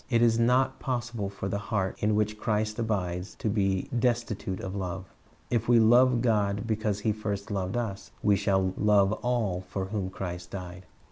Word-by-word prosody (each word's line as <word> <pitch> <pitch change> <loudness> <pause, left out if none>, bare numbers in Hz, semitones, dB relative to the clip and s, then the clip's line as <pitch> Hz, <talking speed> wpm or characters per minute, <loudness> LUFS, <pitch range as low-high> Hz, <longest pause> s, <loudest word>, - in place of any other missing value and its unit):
It 120 -2 +3
is 115 -1 +4
not 125 +3 +3
possible 120 -5 -2
for 95 -1 -5
the 100 +1 -2
heart 100 -2 -1
in 105 0 +2
which 105 0 0
Christ 110 +1 -1
abides 95 -5 -2
to - - -4
be 95 -3 0
destitute 115 -6 -1
of 95 +1 -5
love. 95 -1 -5 0.4
If 115 -1 0
we 120 -1 +7
love 120 +2 +5
God 105 -3 +1
because 110 -2 -1
He 110 - +2
first 105 -1 -4
loved 95 +2 -2
us, 105 -5 -4
we 105 -1 +5
shall 95 -1 +1
love 105 -2 +4
all 115 -7 0
for 95 +1 -2
whom 95 -1 -3
Christ 90 -2 -6
died. 90 -1 -8
105 Hz, 180 wpm, -28 LUFS, 95-115 Hz, 0.4 s, we